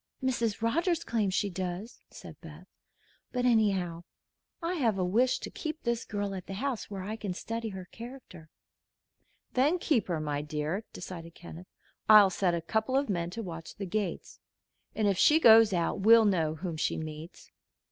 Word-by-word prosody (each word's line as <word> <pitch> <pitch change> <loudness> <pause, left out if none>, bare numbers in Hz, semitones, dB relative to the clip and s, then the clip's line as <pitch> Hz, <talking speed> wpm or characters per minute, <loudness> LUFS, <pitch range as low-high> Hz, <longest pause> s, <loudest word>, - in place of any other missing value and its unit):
"Mrs. 235 -4 -1
Rogers 335 +8 +1
claims 205 -5 -1
she 205 - 0
does," 185 +5 -5
said 165 -4 -11
Beth. 165 +2 -12 0.7
"But 250 -1 -1
anyhow, 195 -8 +1 0.6
I 335 +1 -2
have 235 - +1
a 185 - 0
wish 235 +8 +2
to - - -8
keep 310 -1 -5
this 235 -1 -1
girl 205 -2 -3
at 185 -2 -7
the 195 - -5
house, 255 +2 -3
where 195 -2 -6
I 210 +3 -4
can 200 -4 -5
study 230 +3 -4
her 190 -2 -8
character." 230 -9 -11 1.0
"Then 285 +8 +3
keep 295 -9 +1
her, 170 -4 -1
my 145 -1 -2
dear," 155 +7 -3
decided 170 -2 -9
Kenneth. 175 +1 -11 0.4
"I'll 210 -3 +8
set 180 -2 +1
a 170 - -2
couple 220 +9 0
of 275 -3 0
men 170 -3 -1
to 225 +6 -6
watch 165 -3 -8
the 200 - -5
gates, 195 -1 -4 0.6
and 215 -2 +1
if 195 -2 +1
she 310 +1 +6
goes 225 -5 +7
out 175 0 0
we'll 225 +3 +6
know 165 -6 +1
whom 165 0 -5
she - - -1
meets. 155 +2 -8
200 Hz, 180 wpm, -29 LUFS, 175-230 Hz, 1.0 s, I'll